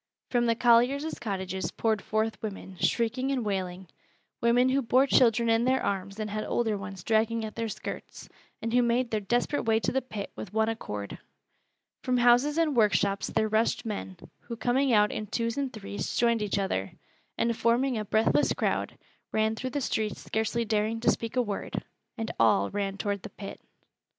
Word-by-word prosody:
From 240 -1 +2
the 230 - +3
colliers' 245 +6 +3
cottages 190 -3 -3
poured 220 -2 0
forth 220 +1 -1
women, 195 -3 -6
shrieking 245 +6 0
and 255 -4 -1
wailing, 185 -2 -3 0.5
women 245 +2 +4
who 270 +1 +2
bore 255 +2 +4
children 235 -3 +4
in 225 0 +3
their 260 +1 +2
arms 195 +1 -3
and 215 - -2
had 215 +1 -2
older 225 -3 0
ones 195 -2 -7
dragging 225 +1 +1
at 215 - -7
their 230 -1 -3
skirts, - - -7 0.4
and 230 0 -2
who 245 - +5
made 240 +1 +1
their 215 - +1
desperate 240 +7 0
way 225 0 +3
to - - 0
the 265 - +1
pit 215 -6 -6
with 205 - -8
one 220 0 +2
accord. 105 - -5 0.8
From 255 -1 +1
houses 245 +5 +4
and 320 -4 +2
workshops 200 -3 +2
there 220 0 +1
rushed 220 +2 +1
men, 200 -4 -5 0.2
who 235 - -7
coming 250 +4 +1
out 210 -2 +4
in 215 - -4
twos 230 +2 -1
and 275 -2 -2
threes 205 -4 -5
joined 235 -2 +3
each 205 -1 -1
other, 145 - -1 0.4
and 235 0 +1
forming 240 +4 +2
a - - -2
breathless 220 +2 +2
crowd, - - -1 0.3
ran 220 0 +1
through 255 +3 -4
the 285 +3 -2
streets 220 -4 -2
scarcely 220 +2 -1
daring 215 +1 0
to - - +4
speak 230 +1 -4
a 250 - +3
word 205 -3 -4 0.3
and 225 -1 -3
all 110 -3 +4
ran 200 -1 -2
toward 200 -1 -2
the - - -8
pit. 200 -1 -9
225 Hz, 185 wpm, -28 LUFS, 205-240 Hz, 0.8 s, who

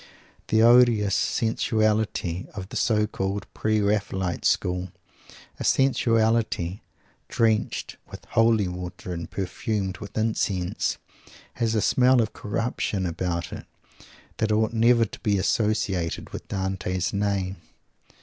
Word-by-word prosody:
The 110 0 +3
odious 120 -4 +5
sensuality 110 -5 0
of 95 -2 -6
the - - -9
so 105 -2 +2
called 100 -1 -3
"Pre 110 0 +1
Raphaelite 100 -3 -1
School" 90 0 0 0.7
a - - -3
sensuality 115 -7 +2 0.5
drenched 110 -2 0
with - - -11
holy 115 -3 +3
water 90 0 -6
and 85 -1 -6
perfumed 95 0 -3
with 105 0 -9
incense 100 -5 -1 0.6
has 115 -2 -1
a 110 - +2
smell 130 0 +4
of 110 -2 0
corruption 105 -3 -2
about 85 0 -3
it - - -8 0.7
that 110 -1 0
ought 110 +1 +1
never 115 +1 +4
to - - -10
be 105 -3 +1
associated 95 -4 0
with - - -8
Dante's 95 -2 -2
name. 100 -2 -1
105 Hz, 120 wpm, -25 LUFS, 95-110 Hz, 0.7 s, odious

